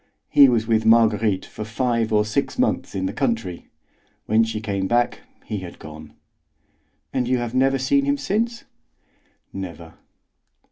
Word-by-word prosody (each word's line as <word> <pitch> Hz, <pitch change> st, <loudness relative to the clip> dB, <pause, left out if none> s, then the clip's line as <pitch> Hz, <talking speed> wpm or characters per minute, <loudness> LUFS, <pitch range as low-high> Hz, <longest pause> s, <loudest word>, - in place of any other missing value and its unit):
He 140 Hz, -2 st, +7 dB
was 115 Hz, -2 st, +1 dB
with 110 Hz, -1 st, +1 dB
Marguerite 110 Hz, -3 st, +3 dB
for 110 Hz, -, -8 dB
five 115 Hz, 0 st, -1 dB
or 105 Hz, -1 st, +3 dB
six 105 Hz, -, -2 dB
months -, -, 0 dB
in 95 Hz, -1 st, -1 dB
the -, -, -2 dB
country. 115 Hz, -10 st, -2 dB, 0.6 s
When 110 Hz, +1 st, +3 dB
she 110 Hz, -1 st, -3 dB
came 100 Hz, -3 st, -2 dB
back, 120 Hz, +3 st, +1 dB, 0.3 s
he 105 Hz, -, -4 dB
had 90 Hz, -2 st, -9 dB
gone." 75 Hz, 0 st, -11 dB, 1.0 s
"And 125 Hz, -2 st, 0 dB
you 130 Hz, 0 st, +2 dB
have 120 Hz, -1 st, -4 dB
never 135 Hz, +1 st, +2 dB
seen 275 Hz, -, +1 dB
him 285 Hz, 0 st, +1 dB
since?" 230 Hz, 0 st, -2 dB, 0.9 s
"Never." 85 Hz, -4 st, -8 dB
110 Hz, 150 wpm, -22 LUFS, 100-125 Hz, 1.0 s, He